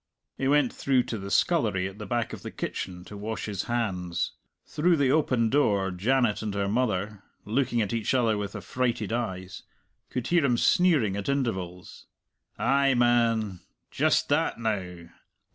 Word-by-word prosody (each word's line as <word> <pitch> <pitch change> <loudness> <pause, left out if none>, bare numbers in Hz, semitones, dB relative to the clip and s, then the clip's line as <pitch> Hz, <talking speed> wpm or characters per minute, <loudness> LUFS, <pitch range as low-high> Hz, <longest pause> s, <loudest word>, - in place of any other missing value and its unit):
He 135 - -1
went 145 -3 +3
through 130 -2 +2
to 115 - -5
the 100 0 -6
scullery 95 -1 +2
at 95 +2 -10
the 105 - -6
back 120 +1 -1
of - - -7
the - - -6
kitchen 90 -1 -5
to 105 - -10
wash 110 +2 -4
his 100 -3 -3
hands. 90 -8 -2 0.3
Through 170 +2 +2
the 135 -3 +3
open 130 -7 +2
door 100 -9 +2
Janet 115 +4 +1
and 105 -2 -3
her 100 -1 0
mother 105 -3 -1 0.2
looking 120 +1 +1
at 100 - -3
each 115 +2 0
other 115 -4 +2
with 105 0 -4
affrighted 110 +2 -2
eyes 95 -6 -4 0.5
could 125 - -3
hear 175 -2 +3
him 125 -4 +2
sneering 145 - +3
at 100 +3 -3
intervals, 95 -10 -3 0.5
"Ay, 140 -1 +3
man!"... 115 -5 +2 0.3
"Just - - +2
that, - - +1
now!"... 90 -6 -3
110 Hz, 160 wpm, -27 LUFS, 100-125 Hz, 0.5 s, went